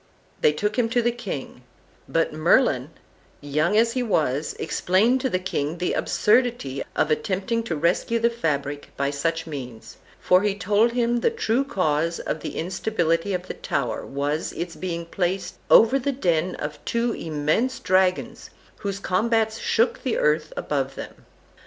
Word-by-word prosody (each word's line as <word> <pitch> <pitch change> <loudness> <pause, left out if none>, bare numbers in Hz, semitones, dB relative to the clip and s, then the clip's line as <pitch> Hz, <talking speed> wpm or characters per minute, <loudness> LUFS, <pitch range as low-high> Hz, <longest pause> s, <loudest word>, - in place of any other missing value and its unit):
They - - +5
took 210 +10 -1
him 230 -2 +2
to 240 0 +1
the 240 - +2
king; 195 - -6 0.5
but 165 -1 +1
Merlin, 155 - +3 0.5
young 150 +7 +1
as 230 +1 +4
he 255 +2 -1
was, 155 - 0
explained 205 +10 +2
to 260 - 0
the 185 - +1
king 165 -4 -2
the 180 +1 -1
absurdity 220 - +1
of 155 - +1
attempting 190 +9 0
to 170 - -2
rescue 170 +9 +1
the 235 +1 +2
fabric 145 -9 -2
by 140 0 0
such 165 +3 -1
means, 125 -7 -8 0.2
for 185 0 +4
he 205 -1 0
told 210 +4 +2
him 240 0 +1
the - - +3
true 275 - 0
cause 165 - 0
of 155 - -3
the - - -6
instability 175 0 0
of 180 0 -5
the - - -4
tower 130 -4 -2
was 145 +3 -2
its 170 0 -5
being 170 -2 -4
placed 180 +1 -2
over 230 +5 +6
the 280 +2 -1
den 180 - 0
of 150 0 -6
two 235 0 0
immense 160 - -1
dragons, 185 0 +1 0.3
whose 200 -1 -3
combats 220 +3 +1
shook 230 +2 +1
the 255 - -1
earth 155 +1 +1
above 135 -2 -2
them. - - -10
180 Hz, 160 wpm, -24 LUFS, 150-230 Hz, 0.5 s, over